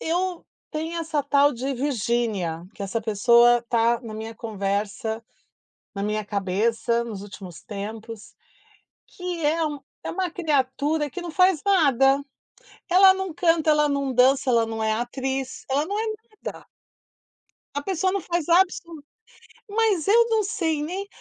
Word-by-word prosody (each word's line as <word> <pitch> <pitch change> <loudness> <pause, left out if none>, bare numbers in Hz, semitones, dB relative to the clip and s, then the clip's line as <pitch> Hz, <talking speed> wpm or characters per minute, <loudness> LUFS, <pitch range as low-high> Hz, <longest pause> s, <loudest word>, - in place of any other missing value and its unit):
eu 355 +1 -2 0.2
tem 320 +2 -4
essa 315 -3 -1
tal 285 +1 +3
de 260 +3 -3
Virginia, 230 - -1
que - - -7
essa 200 +3 -2
pessoa 235 +3 +5
está 235 0 +1
na 230 -3 -8
minha 220 +1 -6
conversa, 210 +1 -3 0.7
na 200 - -4
minha 210 +1 -1
cabeça 215 +4 0
nos 215 -4 -6
últimos 195 -4 -10
tempos, 215 +2 -8 0.7
que 360 -3 -5
é 320 +2 +2
um 295 -1 -4 0.3
é - - -3
uma 370 -2 -2
criatura 295 -2 0
que 355 +6 -7
não 350 - -5
faz 365 -1 +3
nada. 280 -8 +4 0.7
Ela 380 +1 +7
não 380 -4 -4
canta, 330 -2 +2
ela 300 -1 +4
não 280 -2 -1
dança, 260 +2 +4
ela 230 -1 +4
não 225 0 -4
é 220 0 +1
atriz, 260 +3 -3
ela 280 +3 +1
não 405 +2 -2
é 440 - 0 0.4
nada. - - -7 1.1
A 285 - -1
pessoa 375 +2 0
não 395 0 -1
faz 345 -1 -2
absolu 340 -3 +2 0.7
mas 425 -7 +2
eu 465 +3 +5
não 445 -1 +2
sei 325 -7 -1
nem 375 +6 -4
275 Hz, 150 wpm, -24 LUFS, 225-335 Hz, 1.1 s, Ela